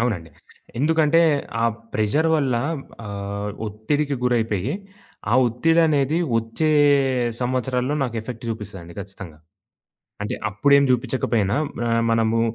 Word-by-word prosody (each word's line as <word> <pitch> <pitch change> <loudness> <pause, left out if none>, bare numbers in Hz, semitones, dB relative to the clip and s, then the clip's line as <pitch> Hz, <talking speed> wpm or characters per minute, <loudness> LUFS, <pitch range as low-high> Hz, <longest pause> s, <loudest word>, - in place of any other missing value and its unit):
అవునండి. 95 -10 -2 0.5
ఎందుకంటే 160 +2 +3 0.4
ఆ - - +3 0.3
ప్రెషర్ 125 +10 +1
వల్ల 135 -4 +1 0.5
ఆహ్, 100 0 -4 0.2
ఒత్తిడికి 140 +8 -1
గురైపోయి, 115 -6 0 0.6
ఆ - - +3
ఒత్తిడనేది 155 +3 +2 0.2
వచ్చే 115 +8 -1 0.7
సంవత్సరాల్లో 125 +2 0
నాకు 120 -3 -2
ఎఫెక్ట్ 115 +1 -8
జూపిస్తదండి 100 -6 -7
ఖచ్చితంగా. 95 -5 -10 0.8
అంటే 105 - -3 0.2
అప్పుడేం 140 +8 +4
జూపిచ్చకపోయినా, 115 -4 +1 0.3
ఆహ్, 115 0 +2
మనము 115 0 +2
115 Hz, 100 wpm, -22 LUFS, 105-140 Hz, 0.8 s, అప్పుడేం